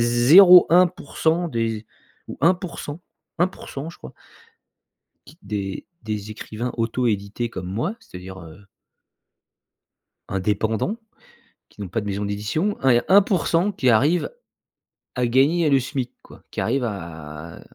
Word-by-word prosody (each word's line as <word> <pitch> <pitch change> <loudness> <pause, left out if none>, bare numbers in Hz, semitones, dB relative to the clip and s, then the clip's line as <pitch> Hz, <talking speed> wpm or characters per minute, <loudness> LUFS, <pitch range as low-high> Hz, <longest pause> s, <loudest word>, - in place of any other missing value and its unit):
0,1% 170 +5 +5
des 115 -4 -1
é 105 - -15 0.4
ou - - -7
1% 175 -3 -1 0.4
1% 165 -4 -3
je - - -16
crois - - -12 1.1
qui - - -16
des 100 -1 -4 0.2
des 105 -1 -4
écrivains 110 +3 -5
auto-édités 115 -1 -1
comme 90 -4 -6
moi, 115 - -3
c'est-à-dire, 95 +1 -10
heu 85 +3 -13 1.6
Indépendant, 105 - -1 0.7
qui 105 - -13
n'ont 100 - -4
pas 115 - -2
de 105 - -6
maison 100 0 -3
d'édition, 105 - -2
hein, 135 -1 +4
il - - +5
y 120 - +5
a - - -10
1% 190 -1 +3
qui 130 -10 +1
arrive 145 +10 +3 0.9
à 125 -1 0
gagner 145 +7 +3
le 135 -1 +4
SMIC 130 -1 -4
quoi, - - -16
qui - - -4
arrive 125 +2 0
à 80 -5 -7
120 Hz, 130 wpm, -22 LUFS, 100-160 Hz, 1.6 s, 0,1